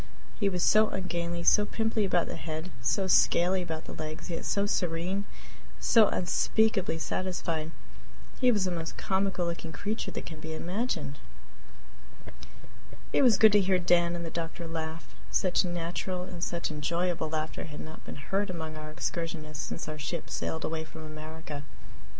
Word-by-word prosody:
He 200 -3 +3
was 180 -2 0
so 215 0 +6
ungainly, 170 -2 -2
so 210 - +6
pimply 220 0 0
about 175 -3 +2
the - - -5
head, 160 +2 -5
so 190 +11 +2
scaly 185 0 +4
about 160 -3 -4
the - - -7
legs, 155 +2 -5
yet 165 - -3
so 200 0 +2
serene, 180 +1 0 0.5
so 225 -3 +6
unspeakably 195 0 +2
satisfied! 165 -2 -2 0.7
He 250 -2 +6
was 205 -5 +2
the 185 - 0
most 165 -2 -4
comical 190 -2 +1
looking 170 -1 -3
creature 205 +9 -2
that - - -5
can 160 -2 -8
be 160 0 -5
imagined. 170 - -2 1.9
It - - +5
was 240 -7 +6
good 220 +1 +8
to 205 0 +6
hear 190 -1 +3
Dan 175 -1 +3
and 170 0 -4
the 165 - -5
doctor 170 0 -4
laugh 160 -6 -5 0.2
such 185 -2 +3
natural 175 +1 -2
and 175 -1 -6
such 170 -2 -1
enjoyable 170 +2 0
laughter 155 0 -3
had 150 -2 -8
not 155 0 -9
been - - -8
heard 195 +8 -1
among 160 -3 -4
our 155 0 -7
excursionists 155 -2 -3
since - - -5
our 155 0 -5
ship 160 +3 -4
sailed 160 - -2
away 160 0 -2
from 160 0 -10
America. 155 -1 -7
170 Hz, 165 wpm, -30 LUFS, 160-190 Hz, 1.9 s, good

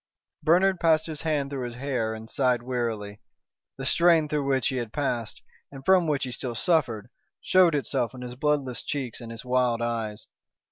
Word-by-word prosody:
Bernard 180 +4 +3
passed 160 -1 +3
his 155 -3 -4
hand 150 -3 -1
through 135 -2 -3
his 120 - -8
hair 125 -4 -2
and 110 0 -9
sighed 125 -1 +1
wearily. 115 -5 -3 0.6
The 135 - -5
strain 170 0 +4
through 145 -2 -1
which 135 -1 +2
he 130 - -2
had 120 -3 -3
passed, 120 -6 -3 0.3
and 135 -1 -11
from 185 -3 +5
which 145 -2 0
he 130 - -3
still 120 -1 -4
suffered, 120 - 0 0.3
showed 180 -4 +4
itself 130 -2 -1
in 125 - -8
his 125 0 -6
bloodless 135 -2 -1
cheeks 130 -5 -4
and 115 - -8
his 115 +2 -9
wild 125 -2 +2
eyes. 115 -3 -3
130 Hz, 185 wpm, -26 LUFS, 120-150 Hz, 0.6 s, from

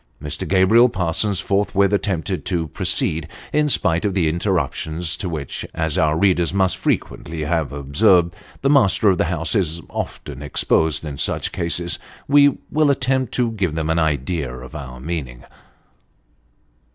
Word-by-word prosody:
Mr. 75 -1 -4
Gabriel 100 +6 +5
Parsons 90 0 0
forthwith 100 0 +1
attempted 95 -2 -1
to 85 -4 -2
proceed, 80 +2 0 0.3
in 150 0 +2
spite 85 - +1
of 100 -2 -1
the 85 -5 +2
interruptions 85 -1 -1
to 90 - -4
which, 75 -4 -5
as 80 -2 -1
our 75 0 +2
readers 90 -2 +2
must 95 -2 +2
frequently 80 -2 -2
have 80 -2 -1
observed, 85 +6 +3 0.3
the 135 - +3
master 110 -6 +4
of 90 - -1
the - - +3
house 80 -2 -2
is 85 -5 0
often 70 -2 -6
exposed 80 +1 +1
in 70 -2 -6
such - - -1
cases. 85 -1 -1 0.3
We 145 0 +5
will 155 -1 +3
attempt 130 -1 +1
to 120 -2 +1
give 95 -8 -2
them 80 0 -1
an 80 - +1
idea 75 -2 -1
of 65 +5 -10
our 65 -4 -8
meaning. 65 -5 -5
85 Hz, 150 wpm, -21 LUFS, 80-100 Hz, 0.3 s, Gabriel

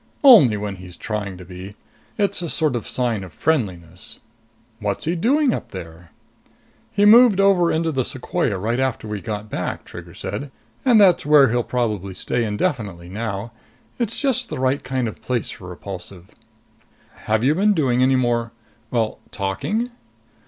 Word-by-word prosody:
"Only 170 - +8
when 100 -1 -4
he's 90 -1 -11
trying 100 -4 -4
to 90 - -11
be. 95 +3 -9 0.4
It's 200 -2 +1
a 170 - -3
sort 155 -5 +1
of 120 - -4
sign 120 -5 -1
of 90 - -10
friendliness." 90 - -2 0.6
"What's 100 -2 -2
he 165 +3 0
doing 260 - +2
up - - -5
there?" 85 -2 -10 0.8
"He 205 0 +2
moved 225 -1 +7
over 195 -3 +4
into 160 0 0
the 130 -3 0
sequoia 125 - -1
right 115 +6 -1
after 130 -4 -1
we 105 -2 -4
got 105 -1 -5
back," - - -4
Trigger - - -11
said. 140 0 -5 0.3
"And 245 -5 +5
that's 190 -4 +5
where 145 -3 +6
he'll 120 +1 +2
probably 105 -6 -2
stay 120 +5 0
indefinitely 105 -5 -2
now. 105 +1 -4 0.5
It's 230 -2 -1
just 260 -3 0
the - - -4
right 130 +2 0
kind 130 -2 -1
of 110 - -8
place 125 -3 -2
for 90 - -10
Repulsive." 90 0 -9 1.0
"Have 110 +1 +2
you 140 +4 +4
been 205 +5 +3
doing 125 -6 +2
any 130 +1 +4
more 120 -2 0 0.4
well, 115 -2 -1
talking?" 205 - -2
120 Hz, 165 wpm, -21 LUFS, 100-165 Hz, 1.0 s, Only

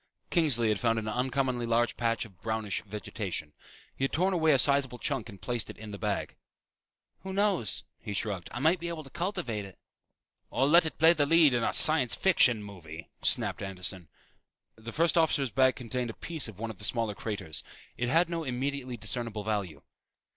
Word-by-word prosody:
Kingsley 135 - +3
had 105 -2 0
found 115 -1 +1
an 110 -1 -3
uncommonly 125 +1 -1
large 115 0 +1
patch 115 -1 0
of 95 -6 -17
brownish 110 -3 -2
vegetation. 100 -6 -6 0.4
He - - -4
had 135 - +1
torn 185 +4 +1
away 160 -3 +3
a 140 - +5
sizeable 135 -2 +2
chunk 130 -2 -3
and 100 -3 -11
placed 120 +2 -3
it - - -9
in 110 -1 -9
the 100 - -7
bag. 105 -2 -3 0.8
"Who 190 - -7
knows?" 195 - +1 0.2
he 105 - -6
shrugged. 95 -4 -2
"I 120 - -5
might 165 +5 +3
be 170 - -4
able 165 -2 -5
to 135 - -14
cultivate 170 - -3
it." 95 -2 -12 0.7
"Or 135 - +1
let 165 +3 +6
it 150 - -6
play 165 +2 +6
the 145 -3 +1
lead 160 -3 +5
in 120 - +1
a - - +1
science 155 -6 +5
fiction 125 - +3
movie," 85 -5 -10
snapped - - +2
Anderson. 95 -3 -4 0.7
The 110 +1 -9
first 165 +5 +3
officer's 145 -6 +2
bag 130 0 +3
contained 125 0 -3
a 115 - -7
piece 160 -7 -1
of 110 -4 -10
one 115 +1 -4
of 105 - -14
the - - -10
smaller 115 -1 0
craters. 100 -7 -5 0.3
It 120 0 -2
had 165 +5 +4
no 165 -1 -3
immediately 130 -1 -3
discernable 115 -1 -4
value. 100 -6 -3
120 Hz, 195 wpm, -29 LUFS, 105-150 Hz, 0.8 s, let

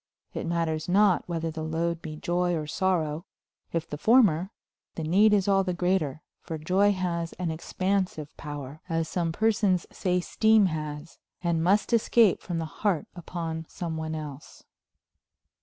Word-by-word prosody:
It - - -4
matters 165 -1 -1
not 195 -1 +3
whether 165 -1 -2
the 160 0 -6
load 165 +1 -1
be 155 -1 -6
joy 175 +2 0
or 155 -2 -2
sorrow; 165 -1 -1 0.4
if 165 -1 -2
the 150 - -6
former, 195 -7 +4 0.5
the 165 - -4
need 195 +7 +4
is 205 -2 +3
all 195 -1 +4
the 180 -2 -2
greater, 175 -5 0 0.2
for 165 -2 -6
joy 185 +6 +3
has 170 -3 -2
an 175 -2 -3
expansive 185 -2 -2
power, 145 -1 -7
as 165 -1 0
some 170 -1 -1
persons 205 -2 +2
say 180 -2 0
steam 220 +3 +4
has, 155 -2 -4 0.2
and 170 -2 +1
must 200 +6 +2
escape 230 -2 +4
from 175 -2 -4
the 165 - -2 0.2
heart 200 -7 +1
upon 165 -2 -5
some 170 -2 -4
one 160 0 -3
else. 150 -2 -8
170 Hz, 155 wpm, -27 LUFS, 160-190 Hz, 0.5 s, former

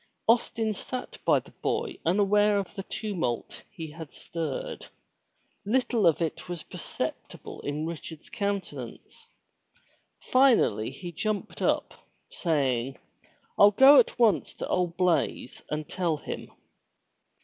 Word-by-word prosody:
Austin 225 -1 +2
sat 250 +5 -6
by - - +5
the - - -7
boy - - -2
unaware 205 +3 +4
of 195 -2 -3
the 200 - -5
tumult 180 - -3
he 165 -7 -8
had 160 -1 -9
stirred. 475 - -5 0.8
Little 235 -2 +2
of 165 +1 +3
it 165 +2 -4
was 175 -3 -4
perceptible - - -6
in 145 +2 -3
Richard's 160 -1 -7
countenance. 200 -1 -5 0.9
Finally 245 - +3
he 175 -2 -8
jumped 210 +4 -3
up, - - +1 0.4
saying: 135 -6 0 0.3
" - - -37
Fll 205 0 +7
go 270 +1 +9
at 240 - +2
once 230 -4 +3
to - - -5
old 175 -2 0
Blaize 170 -7 0
and 150 0 -3
tell 170 -4 -1
him.' - - -7
185 Hz, 125 wpm, -28 LUFS, 160-215 Hz, 0.9 s, go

